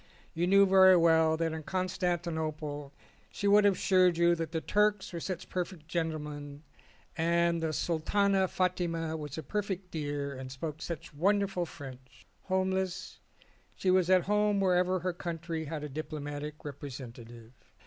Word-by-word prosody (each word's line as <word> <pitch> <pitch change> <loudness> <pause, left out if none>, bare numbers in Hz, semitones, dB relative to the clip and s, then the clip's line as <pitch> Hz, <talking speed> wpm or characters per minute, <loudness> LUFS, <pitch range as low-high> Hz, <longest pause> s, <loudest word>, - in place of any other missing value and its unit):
You 170 +2 0
knew 200 +1 +6
very 190 -1 +7
well 160 -1 +4
that 165 -1 -1
in 160 - -4
Constantinople 160 -5 -2 0.4
she 205 - -2
would 205 +1 +6
have 200 -2 +5
assured 185 -3 +3
you 170 0 +4
that 165 -1 -3
the 165 - -1
Turks 210 +2 +1
were 170 - -3
such 185 +1 -5
perfect 180 -3 -4
gentlemen 150 -3 -4 0.5
and 170 0 +2
the 160 -1 0
Sultana 190 +5 +1
Fatima 170 -3 -1
was 150 -2 -6
a 160 - -4
perfect 195 -3 -3
dear 145 -2 -3
and 130 -1 -8
spoke 150 +3 -6
such 170 -3 -6
wonderful 195 +2 +1
French. 130 -3 -12 0.2
Home 190 0 +1
less, 190 -1 -3 0.6
she 185 - +1
was 185 -1 +3
at 185 -2 +5
home 210 0 +2
wherever 185 -1 +2
her 180 +1 -1
country 170 -2 -4
had 155 0 -5
a - - -3
diplomatic 150 0 -6
representative. 120 -5 -9
170 Hz, 150 wpm, -30 LUFS, 150-185 Hz, 0.6 s, very